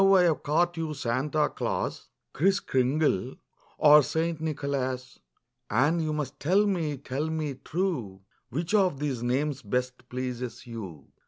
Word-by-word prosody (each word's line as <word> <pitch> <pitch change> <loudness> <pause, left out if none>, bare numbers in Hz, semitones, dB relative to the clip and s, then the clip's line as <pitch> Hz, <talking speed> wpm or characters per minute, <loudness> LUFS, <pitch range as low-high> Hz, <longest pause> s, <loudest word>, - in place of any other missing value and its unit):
I 195 -1 +6
have 165 -3 +2
caught 175 +4 +1
you 160 -2 -2
Santa 145 +4 0
Claus, - - -3 0.3
Kriss 190 +7 +3
Kringle 130 -4 +1 0.4
or 150 0 +8
St. 160 +2 -1
Nicholas, 135 -4 -3 0.5
And 145 +9 +3
you 155 -1 -1
must 145 -3 -3
tell 190 +7 +3
me, 165 -8 0
tell 140 +3 -3
me 155 -3 -2
true. 135 - -2 0.3
Which 165 - -3
of 190 -8 +3
these 140 -5 -2
names 135 +3 0
best 125 +2 -3
pleases 125 -1 -4
you'? 95 - -8
145 Hz, 140 wpm, -28 LUFS, 125-160 Hz, 0.5 s, or